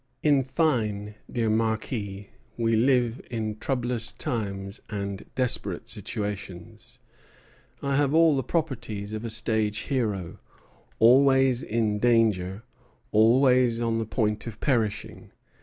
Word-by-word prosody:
In 145 -3 +4
fine, 110 -8 -1 0.2
dear 115 -2 0
Marquis, 110 -2 -2 0.3
we 115 -1 +1
live 125 0 +2
in 110 -2 -4
troublous 120 -3 0
times 100 -3 -4
and 100 -2 -4
desperate 125 -2 0
situations. 100 -5 -6 0.9
I 140 -1 0
have 145 -1 +2
all 165 -2 +5
the 135 - 0
properties 115 -11 -3
of 110 +1 -4
a 115 - -4
stage 110 -1 +1 0.2
hero; 105 -7 -2 0.6
always 135 +1 +5
in 110 -2 -1
danger, 110 -4 +2 0.5
always 120 +2 +4
on 115 -1 0
the 110 - -3
point 105 -1 -1
of 115 - -7
perishing." 115 -7 -2
115 Hz, 115 wpm, -26 LUFS, 105-125 Hz, 0.9 s, all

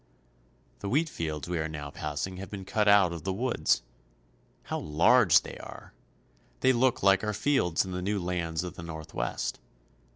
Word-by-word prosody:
The 100 - -4
wheat 155 +8 +2
fields 80 - -4
we 90 -1 -2
are 80 - -1
now 75 -2 -6
passing 75 +6 -4
have 95 +1 -7
been 100 -2 -7
cut 105 +2 0
out 100 -4 +6
of 85 - -7
the 95 - -1
woods. 115 - +1 0.8
How - - -3
large 85 +5 +5
they - - -9
are! - - -11 0.7
They 130 - +5
look 130 +1 +2
like 100 +1 +5
our 105 0 -1
fields 100 - +1
in 95 - -6
the 90 0 -3
new 100 +2 -1
lands 85 -2 -2
of 90 - -6
the - - -9
Northwest. 80 -6 -4
90 Hz, 175 wpm, -29 LUFS, 80-105 Hz, 0.8 s, out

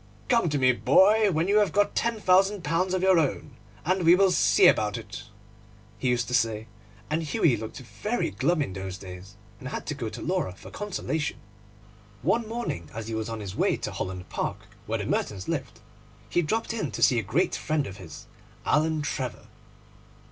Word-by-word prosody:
'Come 230 -9 +3
to 145 - 0
me, 130 -2 +4
my - - -10
boy, 205 +10 +5
when 160 +1 0
you 205 +2 +4
have 205 - +2
got 205 0 +2
ten 235 -1 0
thousand 195 0 +3
pounds 180 +4 0
of 185 - -1
your 190 -2 +5
own, 145 -1 -1 0.3
and 185 +3 +1
we 170 +2 +7
will 195 0 +4
see 105 - +4
about 105 +2 +4
it,' 110 -2 -8 0.7
he 130 - 0
used 120 -2 +1
to - - -4
say; 110 -3 +1 0.5
and 160 +2 +1
Hughie 150 -3 +2
looked 110 0 -7
very 210 - -3
glum 155 +2 +1
in 95 - -6
those 95 -1 -5
days, 95 +1 -10 0.2
and 130 - -7
had - - -5
to - - -3
go 125 -6 -4
to - - -8
Laura 180 - -1
for - - -13
consolation. 170 -6 -3 0.9
One 220 - +1
morning, 225 - -4
as 115 0 -5
he - - -4
was 110 0 -3
on 115 -1 -5
his 100 -1 -6
way - - +2
to - - -4
Holland 90 -1 -5
Park, - - -4 0.2
where - - 0
the - - -4
Mertons 95 -2 -2
lived, - - -3 0.5
he 175 - +2
dropped 220 +8 -1
in 210 -11 -2
to - - -1
see 120 - +5
a - - 0
great 160 - 0
friend 155 -2 -1
of 95 -4 -8
his, 85 -7 -10 0.4
Alan 155 0 +2
Trevor. 130 -3 -4
150 Hz, 200 wpm, -27 LUFS, -, 0.9 s, we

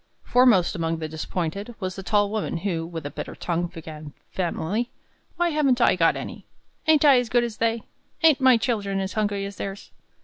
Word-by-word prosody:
Foremost 245 -8 +4
among 165 -1 -1
the 160 -1 -4
disappointed 175 +7 -4
was 185 -2 -4
the 195 - -6
tall 205 +1 +1
woman, 215 -5 -2
who, 165 -4 -1
with 165 -3 -7
a 145 - -4
bitter 150 +1 -6
tongue, 175 0 -2
began 155 -3 -9 0.2
vehemently: 190 +6 -1 0.5
"Why 345 0 +1
haven't 285 -5 +2
I 240 - +4
got 165 -2 +3
any? - - -7 0.4
Ain't 310 -1 +5
I 275 -3 +7
as 245 -2 -3
good 240 +1 +3
as 230 -3 -4
they? 230 0 0 0.4
Ain't 310 -4 +5
my 260 -2 +6
children 205 -5 -1
as 190 0 -3
hungry 205 -2 -1
as 200 0 -8
theirs?" 195 +1 -6
200 Hz, 195 wpm, -24 LUFS, 170-240 Hz, 0.5 s, I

